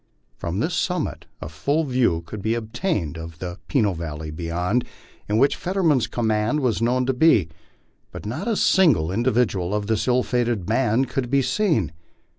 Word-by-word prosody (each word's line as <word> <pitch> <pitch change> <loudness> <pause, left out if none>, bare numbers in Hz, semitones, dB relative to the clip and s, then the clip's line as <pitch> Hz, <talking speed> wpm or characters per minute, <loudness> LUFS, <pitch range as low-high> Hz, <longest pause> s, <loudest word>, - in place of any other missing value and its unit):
From 85 +2 -4
this - - -1
summit - - -2 0.2
a - - -5
full 115 - 0
view 125 - +1
could 105 +4 -7
be 110 +3 0
obtained 110 - -2
of 80 0 -8
the 90 +2 -6
Peno 110 -9 +2
valley 80 -2 -5
beyond, 90 +8 -1 0.5
in 105 - +2
which 135 +4 +4
Fetterman's 165 - +1
command 110 +4 0
was 120 -4 0
known 125 +2 +2
to 130 - +1
be, 125 - +4 0.6
but - - -9
not 145 - -4
a 230 - +1
single 145 - +3
individual 105 -4 +1
of 105 -1 -1
this 110 +2 0
ill 125 0 +3
fated 120 -6 0
band 120 +3 +1
could 125 -1 -3
be 140 +1 +3
seen. 155 - +1
115 Hz, 170 wpm, -23 LUFS, 90-130 Hz, 0.6 s, which